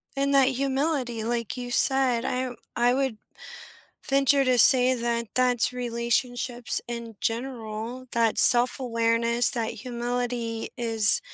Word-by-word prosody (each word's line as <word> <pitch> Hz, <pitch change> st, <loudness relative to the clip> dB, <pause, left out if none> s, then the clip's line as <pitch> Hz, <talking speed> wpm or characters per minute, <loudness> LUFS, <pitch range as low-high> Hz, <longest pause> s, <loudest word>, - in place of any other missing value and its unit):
And 275 Hz, 0 st, -1 dB
that 270 Hz, -1 st, +4 dB
humility, 265 Hz, -3 st, -3 dB
like 235 Hz, 0 st, -4 dB
you 245 Hz, 0 st, -7 dB
said, 260 Hz, -3 st, +4 dB
I 255 Hz, 0 st, -3 dB, 0.2 s
I 240 Hz, +1 st, +1 dB
would 265 Hz, -4 st, -2 dB, 0.9 s
venture 275 Hz, 0 st, +2 dB
to 255 Hz, -1 st, +1 dB
say 255 Hz, 0 st, +6 dB
that 235 Hz, -1 st, -3 dB
that's 250 Hz, -1 st, +1 dB
relationships 240 Hz, 0 st, -3 dB
in 235 Hz, -2 st, -8 dB
general, 235 Hz, 0 st, -6 dB
that 230 Hz, -2 st, 0 dB
self-awareness, 235 Hz, -1 st, +3 dB
that 230 Hz, -2 st, -2 dB
humility 240 Hz, -1 st, -5 dB
is 225 Hz, -3 st, +3 dB
245 Hz, 115 wpm, -24 LUFS, 230-255 Hz, 0.9 s, say